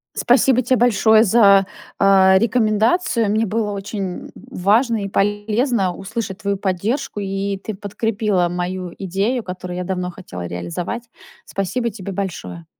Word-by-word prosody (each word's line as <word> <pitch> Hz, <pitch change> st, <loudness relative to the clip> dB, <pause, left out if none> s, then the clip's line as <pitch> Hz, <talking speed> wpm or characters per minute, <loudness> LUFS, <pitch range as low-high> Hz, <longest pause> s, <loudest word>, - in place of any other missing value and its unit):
Спасибо 255 Hz, +1 st, +3 dB
те 255 Hz, +2 st, +2 dB
большое 220 Hz, -2 st, +4 dB
за, 200 Hz, -3 st, +5 dB, 0.3 s
а, 190 Hz, -1 st, +5 dB
рекомендацию. 230 Hz, -, +2 dB
Мне 220 Hz, 0 st, +1 dB
было 210 Hz, 0 st, -1 dB
очень, 195 Hz, -2 st, -5 dB
м, -, -, -16 dB
важно 220 Hz, +4 st, +1 dB
и 195 Hz, -, -4 dB
полезно 205 Hz, 0 st, 0 dB
услышать 200 Hz, -1 st, -5 dB
твою 200 Hz, 0 st, -1 dB
поддержку 205 Hz, +6 st, -2 dB
и 195 Hz, 0 st, -2 dB
ты 215 Hz, +2 st, -6 dB
подкрепила 205 Hz, -2 st, -1 dB
мою 180 Hz, 0 st, -4 dB
идею, 200 Hz, +6 st, -1 dB
которую 180 Hz, -1 st, -6 dB
я 180 Hz, -, -2 dB
давно 180 Hz, -1 st, -3 dB
хотела 90 Hz, -, -8 dB
реализовать. 90 Hz, -, -4 dB, 0.4 s
Спасибо 235 Hz, +5 st, -2 dB
тебе 200 Hz, -2 st, -7 dB
большое! 90 Hz, -, -5 dB
200 Hz, 135 wpm, -20 LUFS, 185-225 Hz, 0.4 s, за